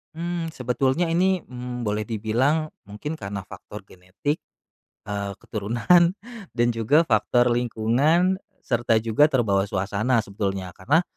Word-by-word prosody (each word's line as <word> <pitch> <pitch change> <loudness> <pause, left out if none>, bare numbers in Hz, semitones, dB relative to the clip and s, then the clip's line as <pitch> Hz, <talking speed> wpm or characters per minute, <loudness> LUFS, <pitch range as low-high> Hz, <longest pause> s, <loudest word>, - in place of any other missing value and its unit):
Mmm, 170 -1 -3
sebetulnya 130 +5 0
ini, 185 +3 +2
mmm, 125 -3 -6
boleh 105 +1 0
dibilang 120 +9 0 0.2
mungkin 105 +10 -6
karna 100 -4 -6
faktor 105 - -10
genetik, 95 - -4 0.6
eee, 100 -1 -4
keturunan, 120 - +2 0.4
dan 120 0 +2
juga 115 +8 +3
faktor 120 -1 +2
lingkungan, 125 +10 +2 0.2
serta 120 -3 +1
juga 115 +6 +4
terbawa 105 -9 +1
suasana 105 +5 0
sebetulnya. 100 -2 -3
Karna 145 - +1
120 Hz, 120 wpm, -24 LUFS, 105-150 Hz, 0.6 s, juga